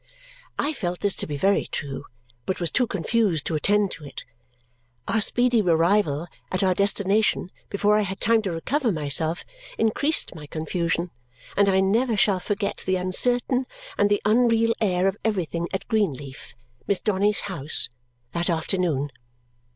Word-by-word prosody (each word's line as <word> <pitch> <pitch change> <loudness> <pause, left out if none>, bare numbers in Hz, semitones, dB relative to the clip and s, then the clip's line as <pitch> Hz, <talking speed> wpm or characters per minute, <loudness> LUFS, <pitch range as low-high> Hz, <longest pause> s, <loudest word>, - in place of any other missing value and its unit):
I 300 +2 0
felt 180 -9 -4
this 205 -2 +1
to - - -3
be 145 -1 -4
very 195 +6 +2
true 140 -2 -5 0.4
but 190 - -1
was 170 -3 -1
too 250 -1 +2
confused 200 -5 0
to - - -2
attend 200 +6 +2
to 160 - -8
it. 140 -2 -8 0.8
Our 220 - +1
speedy 245 +1 +3
arrival 170 -3 +2 0.3
at 185 - +1
our 185 -1 +3
destination, 200 0 +1 0.2
before 210 +1 +2
I - - +2
had 195 -1 -4
time 225 +1 +3
to 195 -4 -3
recover 240 - 0
myself, 155 +1 -1 0.3
increased 280 +8 +2
my 150 -4 -10
confusion, 170 +3 -2 0.4
and 200 0 +4
I 190 0 +3
never 225 +4 +2
shall 195 -2 +3
forget 200 +2 -2
the 190 - +2
uncertain 245 +7 +1 0.3
and 205 - +2
the 205 - +1
unreal 230 +1 +3
air 185 -3 +2
of 195 +1 -1
everything 170 -5 -1
at 190 -1 -4
Greenleaf 140 - -2 0.3
(Miss 200 - +1
Donny's 205 0 +1
house) 160 -7 +1 0.4
that 170 +5 -1
afternoon! 160 -4 0
195 Hz, 155 wpm, -24 LUFS, 170-215 Hz, 0.8 s, and